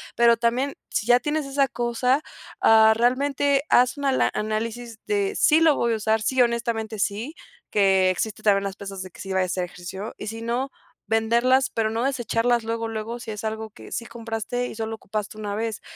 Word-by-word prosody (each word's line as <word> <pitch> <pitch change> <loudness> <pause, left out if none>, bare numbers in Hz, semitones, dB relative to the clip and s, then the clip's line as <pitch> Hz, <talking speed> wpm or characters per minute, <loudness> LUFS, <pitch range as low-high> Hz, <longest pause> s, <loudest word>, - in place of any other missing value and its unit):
pero 235 0 +5
también, 245 +4 0 0.2
si 210 - -1
ya 245 0 +6
tienes 295 +3 -1
esa 275 0 +1
cosa, 245 +3 0 0.4
ah, 220 0 +7
realmente 275 +3 +2
haz 250 +3 +4
una 285 -1 0
ala 265 - +2
análisis 225 +2 -3
de, 410 -1 0
sí 310 -4 +5
lo 315 -3 +5
voy 235 -1 +1
a - - 0
usar, 220 +1 +1
sí, 260 +3 +2
honestamente 230 -2 0
sí, 220 +11 -2 0.4
que 190 -2 +4
existen 205 +4 -2
también 200 -2 +3
las 195 -1 -4
pesas 195 -1 -7
de 185 - -10
que - - -17
si 195 0 -5
vaya 190 0 +2
a - - 0
hacer 180 0 -1
ejercicio 185 +4 -8
y 210 - -7
si 225 +1 -5
no 240 +4 -2 0.4
venderlas, 235 +4 +3
pero 220 -1 -1
no 225 +2 -2
desecharlas 240 -2 +1
luego, 230 0 -2
luego, 225 +2 -5
si 230 -2 -7
es 210 +1 -7
algo 220 0 -4
que 220 - -14
sí 235 - -3
compraste 230 +1 -4
y - - -8
solo 225 0 -4
ocupaste 215 0 -5
una 205 -1 -4
vez, 225 0 -3
230 Hz, 205 wpm, -24 LUFS, 215-245 Hz, 0.4 s, ah